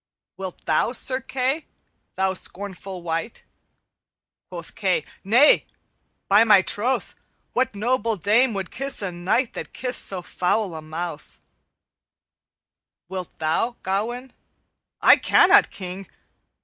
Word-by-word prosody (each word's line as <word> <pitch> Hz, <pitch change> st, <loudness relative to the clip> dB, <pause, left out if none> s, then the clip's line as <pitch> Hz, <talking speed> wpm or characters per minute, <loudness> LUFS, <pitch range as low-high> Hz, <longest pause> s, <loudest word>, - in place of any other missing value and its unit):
"'Wilt 190 Hz, -2 st, -8 dB
thou, 160 Hz, +9 st, +1 dB
Sir 260 Hz, 0 st, 0 dB
Kay, 270 Hz, +4 st, -2 dB, 0.5 s
thou 190 Hz, 0 st, +1 dB
scornful 190 Hz, -1 st, -7 dB
wight?' 165 Hz, +6 st, -4 dB, 1.1 s
Quoth -, -, -8 dB
Kay, 475 Hz, -, 0 dB, 0.2 s
'Nay, 240 Hz, +9 st, +5 dB, 0.6 s
by 205 Hz, +3 st, +6 dB
my 210 Hz, -4 st, +6 dB
troth! 245 Hz, +8 st, 0 dB, 0.4 s
What 255 Hz, -4 st, 0 dB
noble 230 Hz, +1 st, 0 dB
dame 220 Hz, +6 st, +3 dB
would 195 Hz, -2 st, -4 dB
kiss 275 Hz, -4 st, -3 dB
a 190 Hz, -, -2 dB
knight 190 Hz, +9 st, 0 dB
That -, -, -7 dB
kissed 250 Hz, 0 st, +1 dB
so 185 Hz, -2 st, 0 dB
foul 185 Hz, +2 st, -1 dB
a 160 Hz, -, -6 dB
mouth_?' 155 Hz, 0 st, -7 dB, 1.7 s
"'_Wilt 185 Hz, -2 st, -4 dB
thou, 160 Hz, +10 st, 0 dB
Gawaine?' 240 Hz, +7 st, -3 dB, 0.7 s
'I -, -, +8 dB
cannot, -, -, +5 dB
King.' 185 Hz, 0 st, -7 dB
200 Hz, 115 wpm, -23 LUFS, 180-245 Hz, 1.7 s, I